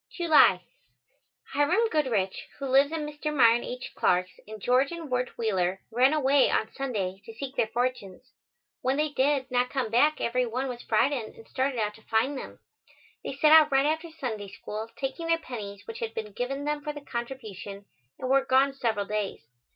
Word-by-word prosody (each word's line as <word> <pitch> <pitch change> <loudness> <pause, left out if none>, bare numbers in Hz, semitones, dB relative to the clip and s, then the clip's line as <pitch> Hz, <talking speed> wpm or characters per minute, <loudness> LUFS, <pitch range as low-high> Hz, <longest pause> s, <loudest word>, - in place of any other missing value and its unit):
July. 310 - +5 0.9
Hiram 345 +11 +3
Goodrich, 230 - 0
who 275 - -5
lives 275 +2 +4
at 325 -1 -2
Mr. 300 0 -4
Myron 240 -4 +5
H. 250 +1 -6
Clark's, 180 +1 +2 0.2
and 215 0 -8
George 255 - +2
and 335 -5 -7
Wirt 250 0 -1
Wheeler 190 -4 0
ran 250 +4 +4
away 285 -2 +4
on 220 - 0
Sunday 200 -9 -3
to 225 - -10
seek 270 +3 -6
their 225 - +1
fortunes. 245 -1 -3 0.5
When 260 +2 0
they 305 +1 +1
did 275 -1 +1
not 250 0 +2
come 255 -6 -2
back 295 +7 +3
every 250 +1 0
one 255 +4 -2
was 245 -2 -6
frightened 235 +1 0
and 225 - -15
started 260 0 -1
out 210 -1 0
to 220 - -17
find 230 +6 0
them. 265 - -7 0.7
They - - -5
set 300 +2 +4
out 310 -1 +8
right 270 +1 +4
after 320 +2 -1
Sunday 240 -10 -5
School, 215 +3 -7
taking 275 +5 -4
their 330 0 +3
pennies 210 -10 -8
which 225 - -7
had 225 -1 -4
been 215 -1 -5
given 270 +6 -3
them 295 0 -1
for 300 +1 -4
the 290 - -8
contribution, 220 -6 -7 0.3
and 255 - -4
were 270 +1 +4
gone 270 +1 +3
several 225 -6 -1
days. 210 -1 -3
255 Hz, 190 wpm, -27 LUFS, 220-285 Hz, 0.9 s, out